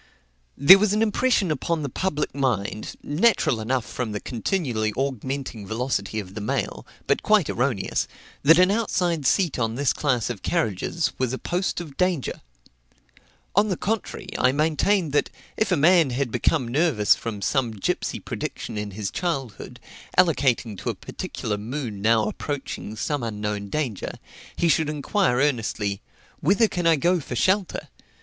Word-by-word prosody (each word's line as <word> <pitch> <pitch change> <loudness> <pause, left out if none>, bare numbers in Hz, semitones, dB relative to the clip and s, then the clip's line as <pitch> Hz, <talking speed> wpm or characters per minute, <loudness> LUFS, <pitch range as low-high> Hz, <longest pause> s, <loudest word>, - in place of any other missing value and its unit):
There 180 +8 +9
was 210 0 +2
an 215 +1 +3
impression 215 -4 +2
upon 155 +2 -1
the - - -1
public 150 +2 -2
mind, 110 -6 -2
natural 150 - +2
enough 125 +2 -1
from 120 -4 -4
the 105 - -2
continually 120 - -1
augmenting 130 -4 -3
velocity 110 -2 -2
of 95 -2 -8
the 105 - -5
mail, 105 - -3 0.2
but - - +1
quite - - +3
erroneous, - - 0 0.3
that 165 +4 +7
an 185 +1 +5
outside 180 - 0
seat 175 -6 +2
on 115 -1 0
this 140 0 +1
class 125 -5 0
of 105 -6 -7
carriages 165 - -1
was 130 -1 0
a - - -1
post 180 +6 -2
of 155 -6 -9
danger. 180 -7 0 1.1
On 205 +2 +4
the 185 - -1
contrary, 210 -2 -3
I 130 - +4
maintained 160 +4 +1
that, 145 - +1 0.3
if 215 - 0
a 180 - +3
man 165 0 +5
had 125 -1 -1
become 125 +2 +1
nervous 125 - +3
from 110 -3 -5
some 125 +4 +1
gipsey 105 -3 -2
prediction 105 - -5
in 105 0 -4
his 105 -3 -3
childhood, 140 - -4 0.4
allocating 130 - +2
to - - -3
a - - -2
particular 105 -2 -5
moon 115 -2 -5
now 110 +1 +4
approaching 110 -1 -4
some 145 +5 -2
unknown 105 -2 -3
danger, 130 -9 -2
and - - -14 0.4
he 170 - +1
should 160 -1 +2
inquire 150 - +1
earnestly, 110 -7 0 0.4
"Whither 200 +8 +3
can 175 -4 -1
I 165 - +6
go 175 +5 +2
for 130 -4 -6
shelter? 190 - +1
140 Hz, 160 wpm, -24 LUFS, 110-175 Hz, 1.1 s, There